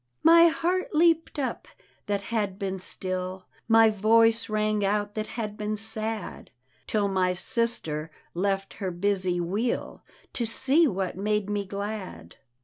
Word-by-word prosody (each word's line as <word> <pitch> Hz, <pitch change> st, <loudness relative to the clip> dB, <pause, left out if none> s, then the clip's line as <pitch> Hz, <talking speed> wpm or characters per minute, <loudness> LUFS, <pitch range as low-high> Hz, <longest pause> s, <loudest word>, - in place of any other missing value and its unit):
My 335 Hz, +1 st, +8 dB
heart 335 Hz, +4 st, -1 dB
leapt 330 Hz, 0 st, +3 dB
up 270 Hz, -3 st, -3 dB, 0.4 s
that 200 Hz, -1 st, -1 dB
had 205 Hz, -4 st, -1 dB
been 190 Hz, -1 st, -3 dB
still, 185 Hz, 0 st, -4 dB, 0.2 s
My 225 Hz, -1 st, +6 dB
voice 225 Hz, +2 st, +3 dB
rang 215 Hz, -1 st, 0 dB
out 205 Hz, +1 st, 0 dB
that 215 Hz, 0 st, -3 dB
had 210 Hz, -3 st, -3 dB
been 210 Hz, 0 st, -3 dB
sad, 220 Hz, -1 st, -3 dB, 0.4 s
Till 210 Hz, -2 st, +1 dB
my 185 Hz, -2 st, +1 dB
sister 175 Hz, -8 st, 0 dB, 0.2 s
left 195 Hz, +2 st, -1 dB
her 190 Hz, -, -1 dB
busy 185 Hz, 0 st, 0 dB
wheel 200 Hz, +8 st, -2 dB, 0.3 s
To 240 Hz, -, -2 dB
sec 275 Hz, +8 st, +3 dB
what 190 Hz, -5 st, -3 dB
made 210 Hz, 0 st, -1 dB
me 205 Hz, -1 st, -1 dB
glad. 200 Hz, -, -6 dB
210 Hz, 140 wpm, -26 LUFS, 190-225 Hz, 0.4 s, My